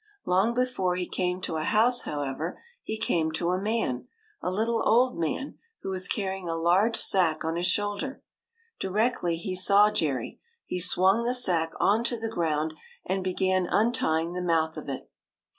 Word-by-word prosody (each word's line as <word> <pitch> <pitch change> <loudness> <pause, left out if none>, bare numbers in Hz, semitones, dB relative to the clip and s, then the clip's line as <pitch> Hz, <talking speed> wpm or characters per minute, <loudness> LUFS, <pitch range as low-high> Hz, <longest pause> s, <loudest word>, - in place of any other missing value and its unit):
Long 195 +6 +2
before 245 -8 0
he 180 0 -2
came 180 0 -2
to 160 - -2
a 155 - -2
house, 230 +7 +3
however, 145 +3 -4 0.2
he 220 - -4
came 160 -6 0
to 170 +2 0
a 185 +1 -1
man, 205 - -1 0.3
a - - -1
little 225 +4 0
old 250 +1 +3
man, 170 - -3 0.2
who 195 - -3
was 185 0 -1
carrying 190 -4 -2
a 165 - -1
large 180 +7 +2
sack 165 -5 +2
on 160 +1 -1
his 175 +1 0
shoulder. 205 +8 -2 0.6
Directly 195 -3 0
he 185 +3 -4
saw 200 +3 +5
Jerry, 140 - -2 0.3
he 180 - -3
swung 185 +5 +4
the 245 +2 0
sack 170 -9 +1
on 215 +4 +3
to 240 0 0
the 225 0 -3
ground 160 -5 -1 0.3
and 190 0 -1
began 185 0 +1
untying 175 -8 +1
the 180 - -3
mouth 160 -2 +1
of 155 -2 -7
it. 135 - -5
185 Hz, 175 wpm, -27 LUFS, 165-215 Hz, 0.6 s, saw